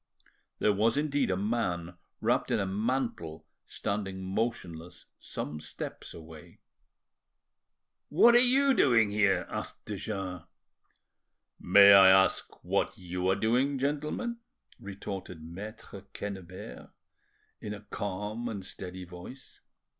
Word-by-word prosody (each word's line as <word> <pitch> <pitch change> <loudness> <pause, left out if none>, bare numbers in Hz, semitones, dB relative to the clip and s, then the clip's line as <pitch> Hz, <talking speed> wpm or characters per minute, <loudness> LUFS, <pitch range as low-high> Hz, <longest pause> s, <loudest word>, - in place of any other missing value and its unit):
There 105 - +2
was 110 +5 +2
indeed 145 -1 +1
a 90 - +1
man 95 -5 -2 0.3
wrapped - - +1
in - - +1
a 100 - 0
mantle 105 -5 -2 0.2
standing 95 -2 -4
motionless 90 -5 -4
some 75 +1 -5
steps 75 0 -7
away. 80 -1 -12 1.5
"What 235 +10 +6
are 240 - +8
you 265 +2 +4
doing 115 - +4
here?" 100 -2 +2
asked - - -6
de 105 - -5
Jars. 95 -3 -4 1.2
"May 100 +2 +8
I 95 -1 +9
ask 95 0 +3
what - - 0
you 90 +1 -2
are 95 - +3
doing, 125 +7 +1
gentlemen?" 150 - -2 0.4
retorted 95 -4 -7
Maitre 100 +4 -9
Quennebert, 95 -10 -7 0.7
in 105 0 -5
a 105 - -11
calm 105 +3 -4
and 100 -4 -6
steady 95 -1 -7
voice. 90 +9 -12
100 Hz, 115 wpm, -30 LUFS, 90-115 Hz, 1.5 s, I